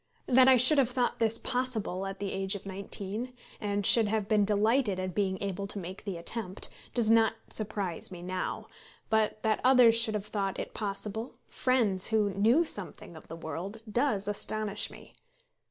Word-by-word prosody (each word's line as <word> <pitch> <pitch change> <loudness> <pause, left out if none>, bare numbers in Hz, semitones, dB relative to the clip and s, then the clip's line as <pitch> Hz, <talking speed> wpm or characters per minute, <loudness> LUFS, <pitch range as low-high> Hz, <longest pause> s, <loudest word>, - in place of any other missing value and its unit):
That 255 +1 +5
I 260 -1 +7
should 265 +5 +5
have 255 -3 +3
thought 250 -1 -1
this 225 0 +2
possible 225 -8 -2
at 195 0 -6
the 200 0 -4
age 195 +1 0
of 200 - -8
nineteen, 200 +5 -4 0.3
and 205 -2 -2
should 225 0 +6
have 210 -1 -1
been 210 -1 +3
delighted 210 0 +2
at 185 -1 -3
being 190 -1 0
able 200 0 -3
to 200 - -3
make 190 +2 -7
the 195 -4 -4
attempt, 190 +2 -4 0.3
does 230 -3 +3
not 225 -1 +4 0.2
surprise 200 -5 -2
me 175 -1 -9
now; 185 0 -3 0.5
but 215 -1 +1
that 220 -1 +1
others 250 -3 +6
should 225 -1 +2
have 205 -1 -3
thought 195 -2 -3
it - - -6
possible, 210 +3 -4
friends 220 -8 +1
who 215 -3 +2
knew 225 - +4
something 205 - -4
of 160 - -13
the 165 - -8
world, 180 +7 -6
does 220 -5 +1
astonish 210 0 -1
me. - - -14
210 Hz, 180 wpm, -29 LUFS, 195-230 Hz, 0.5 s, I